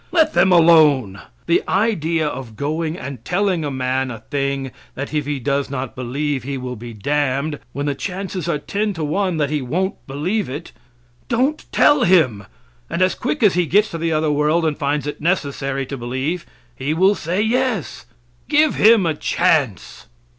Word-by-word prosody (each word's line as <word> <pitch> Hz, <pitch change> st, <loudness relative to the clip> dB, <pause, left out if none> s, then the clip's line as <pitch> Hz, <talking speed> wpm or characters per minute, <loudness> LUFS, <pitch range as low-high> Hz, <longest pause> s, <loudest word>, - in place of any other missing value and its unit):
Let 330 Hz, -3 st, +3 dB
them 175 Hz, +2 st, +4 dB
alone. 155 Hz, -, +5 dB, 0.2 s
The -, -, +3 dB
idea 170 Hz, -6 st, +1 dB
of 125 Hz, -6 st, -6 dB
going 155 Hz, +5 st, -2 dB
and 130 Hz, -5 st, -7 dB
telling 185 Hz, 0 st, 0 dB
a 145 Hz, -, -2 dB
man 130 Hz, 0 st, -1 dB
a 120 Hz, -, -6 dB
thing 140 Hz, -2 st, -1 dB, 0.2 s
that 140 Hz, +3 st, -5 dB
if 150 Hz, -2 st, -1 dB
he 145 Hz, -2 st, -2 dB
does 140 Hz, +2 st, -1 dB
not 135 Hz, -2 st, -4 dB
believe 135 Hz, +3 st, -2 dB
he 135 Hz, +2 st, -4 dB
will 125 Hz, -1 st, -5 dB
be 120 Hz, +1 st, -8 dB
damned, 140 Hz, +5 st, -1 dB
when 140 Hz, +3 st, -4 dB
the 145 Hz, -, 0 dB
chances 185 Hz, +1 st, -4 dB
are 150 Hz, -, +1 dB
ten 205 Hz, +7 st, -2 dB
to 165 Hz, -3 st, -4 dB
one 180 Hz, +3 st, 0 dB
that 145 Hz, -2 st, 0 dB
he 150 Hz, -2 st, 0 dB
won't 180 Hz, +11 st, -3 dB
believe 160 Hz, +8 st, -2 dB
it. 145 Hz, +6 st, -7 dB, 0.6 s
Don't 260 Hz, +6 st, 0 dB
tell 290 Hz, -2 st, +4 dB
him, 130 Hz, -, +3 dB, 0.4 s
and 185 Hz, -, +1 dB
as 185 Hz, -, +2 dB
quick 255 Hz, +1 st, -2 dB
as 205 Hz, -, +5 dB
he 175 Hz, -1 st, +1 dB
gets 210 Hz, +5 st, +3 dB
to 165 Hz, -, -5 dB
the 165 Hz, 0 st, -1 dB
other 155 Hz, -1 st, +1 dB
world 150 Hz, +3 st, +2 dB
and 155 Hz, -2 st, 0 dB
finds 145 Hz, 0 st, -1 dB
it 145 Hz, -, -5 dB
necessary 140 Hz, -5 st, -1 dB
to 135 Hz, +1 st, -6 dB
believe, 130 Hz, +8 st, -3 dB, 0.3 s
he 145 Hz, +4 st, -2 dB
will 190 Hz, +4 st, +4 dB
say 180 Hz, -1 st, -3 dB
"yes." 225 Hz, -, -1 dB, 0.4 s
Give 305 Hz, 0 st, +4 dB
him 220 Hz, -3 st, +5 dB
a 160 Hz, -, +1 dB
chance. 150 Hz, -, 0 dB
150 Hz, 180 wpm, -20 LUFS, 135-185 Hz, 0.6 s, alone